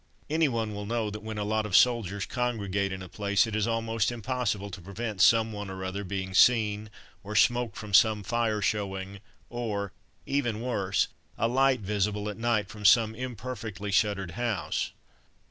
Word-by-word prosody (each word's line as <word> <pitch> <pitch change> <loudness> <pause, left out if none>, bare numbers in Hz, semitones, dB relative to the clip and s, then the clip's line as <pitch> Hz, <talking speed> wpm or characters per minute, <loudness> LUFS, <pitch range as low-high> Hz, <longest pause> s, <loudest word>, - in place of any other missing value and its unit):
Anyone 120 -9 +1
will 105 0 -5
know 115 -2 -1
that 105 0 -7
when 110 0 -6
a 105 - -1
lot 110 +1 0
of 95 - 0
soldiers 105 -6 +2
congregate 100 -6 -1
in 95 0 -5
a - - -8
place 100 +2 +1
it 110 -2 -4
is 110 0 +1
almost 115 -1 0
impossible 120 -4 -2
to 95 0 -8
prevent 100 +2 -4
someone 110 -1 +3
or 95 0 -6
other 95 +2 -3
being 95 0 -4
seen, 105 -1 +4 0.3
or 105 +1 -6
smoke 120 -1 +3
from 105 -2 -8
some 110 0 +5
fire 110 0 0
showing, 100 -1 -2 0.3
or, 105 -5 -3 0.3
even 120 -6 -1
worse, 100 -6 0 0.3
a 115 - +2
light 130 +1 +3
visible 105 +1 -1
at 105 - -6
night 115 -3 +1
from 105 0 -10
some 110 +2 +5
imperfectly 115 -4 -5
shuttered 95 -2 +1
house. 115 0 -2
105 Hz, 165 wpm, -28 LUFS, 100-115 Hz, 0.3 s, some